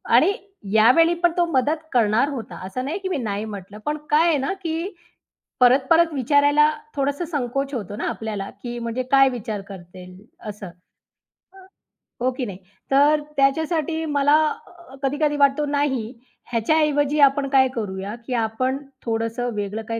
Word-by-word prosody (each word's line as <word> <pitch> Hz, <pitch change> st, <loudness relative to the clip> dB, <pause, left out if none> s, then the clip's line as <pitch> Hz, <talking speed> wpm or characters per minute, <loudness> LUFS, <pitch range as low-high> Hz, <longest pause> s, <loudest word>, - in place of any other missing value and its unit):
आणि 400 Hz, -, +5 dB, 0.4 s
यावेळी 255 Hz, +11 st, +5 dB
पण 345 Hz, -, +5 dB
तो 350 Hz, -, +3 dB
मदत 300 Hz, +4 st, +1 dB
करणार 235 Hz, +4 st, +3 dB
होता, 255 Hz, -6 st, -6 dB
असं 255 Hz, +7 st, -4 dB
नाही, 320 Hz, +7 st, -2 dB
की 380 Hz, -1 st, -4 dB
मी 345 Hz, -, -1 dB
नाही 210 Hz, -3 st, -3 dB
म्हटलं. 200 Hz, -1 st, -8 dB
पण 300 Hz, +1 st, -1 dB
काय 315 Hz, +3 st, +4 dB
आहे 315 Hz, -3 st, +3 dB
ना, 275 Hz, +5 st, -2 dB
की 350 Hz, 0 st, -4 dB, 0.7 s
परत-परत 275 Hz, +6 st, +4 dB
विचारायला 290 Hz, +3 st, +4 dB, 0.3 s
थोडंसं 285 Hz, +4 st, -1 dB
संकोच 275 Hz, -2 st, -3 dB
होतो 205 Hz, -4 st, -5 dB
ना -, -, -3 dB
आपल्याला, 210 Hz, -3 st, -5 dB
की 240 Hz, 0 st, -5 dB
म्हणजे 235 Hz, +2 st, -3 dB
काय 270 Hz, -1 st, +6 dB
विचार 220 Hz, -4 st, -5 dB
करतील 180 Hz, -1 st, -11 dB, 0.3 s
असं. 205 Hz, -2 st, -8 dB, 0.9 s
अ, 385 Hz, -, -17 dB, 0.6 s
हो 255 Hz, +1 st, +2 dB
की 255 Hz, -, -2 dB
नाही. 195 Hz, -4 st, -7 dB, 0.3 s
तर 295 Hz, +2 st, +4 dB, 0.2 s
त्याच्यासाठी 320 Hz, +3 st, +1 dB
मला 290 Hz, 0 st, +3 dB, 0.3 s
अ, 345 Hz, -6 st, -16 dB
कधी-कधी 290 Hz, +2 st, 0 dB
वाटतो 280 Hz, +1 st, +3 dB
नाही, 285 Hz, -5 st, 0 dB, 0.5 s
ह्याच्याऐवजी 290 Hz, +4 st, +1 dB
आपण 275 Hz, 0 st, -3 dB
काय 265 Hz, -1 st, +5 dB
करूया, 200 Hz, -1 st, -4 dB
की 255 Hz, -, -3 dB
आपण 255 Hz, +5 st, -1 dB, 0.3 s
थोडंसं 230 Hz, +2 st, -2 dB
वेगळं 205 Hz, +2 st, -3 dB
काही 230 Hz, 0 st, -2 dB
270 Hz, 155 wpm, -22 LUFS, 225-300 Hz, 0.9 s, काय